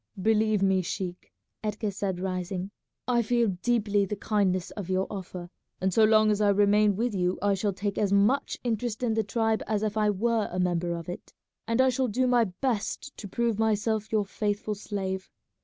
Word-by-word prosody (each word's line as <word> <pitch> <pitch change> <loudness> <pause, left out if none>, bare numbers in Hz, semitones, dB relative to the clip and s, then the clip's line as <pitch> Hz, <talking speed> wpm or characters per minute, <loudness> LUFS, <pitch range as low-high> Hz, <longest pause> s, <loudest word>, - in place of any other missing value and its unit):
"Believe 215 0 +2
me, 190 -1 +3
sheik," 180 0 -5 0.3
Edgar 210 0 -2
said, 190 -2 -3
rising, 185 +1 -3 0.4
"I 240 -1 +3
feel 235 0 +2
deeply 210 -4 +2
the 200 +2 -2
kindness 195 -4 0
of 200 -4 -7
your 190 0 +1
offer, 180 -3 -7 0.3
and 190 0 0
so 220 - +5
long 215 0 +5
as 210 0 0
I 205 - +4
remain 205 +1 +4
with 235 +3 -1
you 180 -1 0
I 200 0 +2
shall 200 +1 0
take 200 +1 -3
as 205 -2 +1
much 205 +8 +2
interest 235 0 -2
in 230 -2 +1
the 220 0 +1
tribe 220 +1 0
as 215 -1 0
if 215 0 -1
I 210 -1 +3
were 220 +2 0
a 180 - -4
member 175 -1 0
of 170 -1 -7
it, 175 - -8 0.3
and 230 +2 0
I 260 0 +5
shall 255 +1 0
do 250 +4 +1
my 245 -2 +4
best 235 +6 -3
to 205 - -7
prove 230 +1 -1
myself 220 0 0
your 215 -2 +2
faithful 205 +1 -2
slave. 190 -2 -4
210 Hz, 195 wpm, -27 LUFS, 190-220 Hz, 0.4 s, so